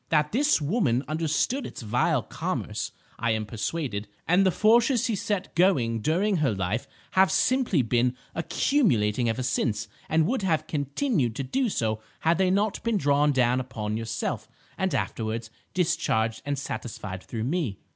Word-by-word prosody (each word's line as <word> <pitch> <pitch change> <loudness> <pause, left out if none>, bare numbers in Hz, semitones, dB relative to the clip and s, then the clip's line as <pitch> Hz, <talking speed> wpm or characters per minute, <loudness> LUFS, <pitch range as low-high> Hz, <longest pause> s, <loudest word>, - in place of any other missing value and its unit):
That 150 -1 +2
this 285 - +3
woman 145 - +1
understood 160 - 0
its - - -7
vile 115 +3 +1
commerce, - - -3 0.3
I 115 0 +1
am 110 -1 -2
persuaded, 110 -1 -3 0.2
and 180 +3 +5
the 190 - +4
forces 230 +5 +4
she 230 -4 0
set 195 -1 -2
going 135 -11 +3
during 185 - +1
her 150 -6 +2
life 95 +5 -2 0.2
have 190 0 +4
simply 250 - +2
been 120 +2 +1 0.2
accumulating 125 - +1
ever 120 +3 -1
since, 105 -4 0 0.2
and 160 0 +3
would 250 +6 0
have 160 -5 +1
continued 145 - -1
to 135 - -2
do 250 - 0
so 110 - -1 0.2
had 165 +2 +2
they 190 -1 +3
not 200 +2 +1
been 230 -2 +1
drawn 145 -2 +3
down 125 -2 +2
upon 110 -4 -4
yourself, 115 0 -3 0.3
and - - 0
afterwards 110 0 -3 0.2
discharged 115 -10 +1
and 145 -1 0
satisfied 105 -8 -5
through 110 +2 -5
me. 135 - -1
145 Hz, 155 wpm, -26 LUFS, 115-190 Hz, 0.3 s, and